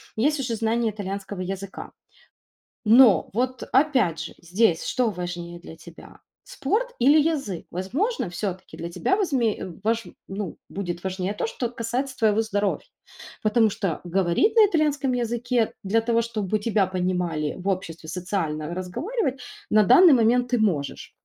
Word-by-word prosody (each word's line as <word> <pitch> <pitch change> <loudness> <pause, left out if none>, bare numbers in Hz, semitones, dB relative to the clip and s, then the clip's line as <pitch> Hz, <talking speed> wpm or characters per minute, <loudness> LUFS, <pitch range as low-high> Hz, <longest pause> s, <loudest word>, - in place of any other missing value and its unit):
есть 290 +7 +1
уже 240 -4 -2
знание 225 +1 0
итальянского 200 -1 -5
языка. 195 +1 -6 1.0
Но 230 -1 +6
вот, 255 +2 -1
опять 255 - +3
же, - - -8
здесь 175 0 +1
что 245 -3 +1
важнее 175 -2 -6
для 165 - -11
тебя? 165 +1 -14 0.2
Спорт - - -2
или 285 +5 +6
язык? 280 - -2
Возможно, 230 - -2
всё-таки 185 0 -5
для 170 - -4
тебя 380 - 0
возме 270 - +1
э, - - -5 0.2
вож 225 +1 +1 0.2
ну, 195 -2 -5
будет 175 -3 -5
важнее 190 +1 -2
то, - - -2
что 235 +1 -3
касается 245 +3 -3
твоего 215 -1 +3
здоровья. 205 -3 -1 0.6
Потому 220 +1 +3
что 195 -4 -2
говорить 190 - +1
на 435 - +8
итальянском 295 -7 +1
языке 240 -1 0
для 210 +4 +2
того, 230 0 +1
чтобы 215 -3 -2
тебя 210 -2 +1
понимали 180 -4 -1
в 190 +2 -4
обществе, 165 -4 -3
социально 165 -3 -3
разговаривать, 270 - -3 0.3
на 215 0 +5
данный 310 - +7
момент 245 +1 +3
ты 245 - +3
можешь. 170 -10 -1
215 Hz, 145 wpm, -24 LUFS, 185-250 Hz, 1.0 s, на